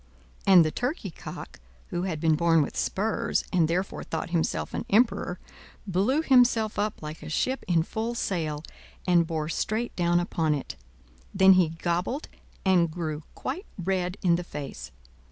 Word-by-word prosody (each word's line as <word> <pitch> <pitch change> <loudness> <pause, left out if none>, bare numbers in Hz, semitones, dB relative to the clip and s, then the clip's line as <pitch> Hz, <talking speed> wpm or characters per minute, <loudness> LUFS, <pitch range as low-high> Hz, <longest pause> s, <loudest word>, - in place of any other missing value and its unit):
And 180 -4 +8
the 155 - 0
turkey 250 - -3
cock, - - -9 0.3
who 175 - -2
had 160 -3 -3
been 160 0 +3
born 165 0 +4
with - - -6
spurs, 215 +3 0
and 170 -3 +4
therefore 180 +4 -2
thought 165 +1 -4
himself 170 -2 -1
an - - -2
emperor, 210 -5 +2 0.5
blew 210 - +1
himself 245 -6 +4
up 210 -5 -2
like 155 +1 -7
a 155 - -8
ship 260 +12 -1
in 170 -3 +3
full 225 +6 -3
sail, 155 -8 -2 0.4
and 175 -2 +4
bore 160 -2 -2
straight 220 +8 -2
down 175 -1 +2
upon 165 -3 0
it; 140 - -6 0.6
then 190 0 +7
he 180 -3 +4
gobbled 180 - -2 0.4
and 180 -3 +4
grew 155 -2 -4
quite 345 +11 -5
red 180 0 -1
in 170 -2 +4
the 180 - -4
face. 140 - -7
175 Hz, 160 wpm, -27 LUFS, 160-205 Hz, 0.6 s, And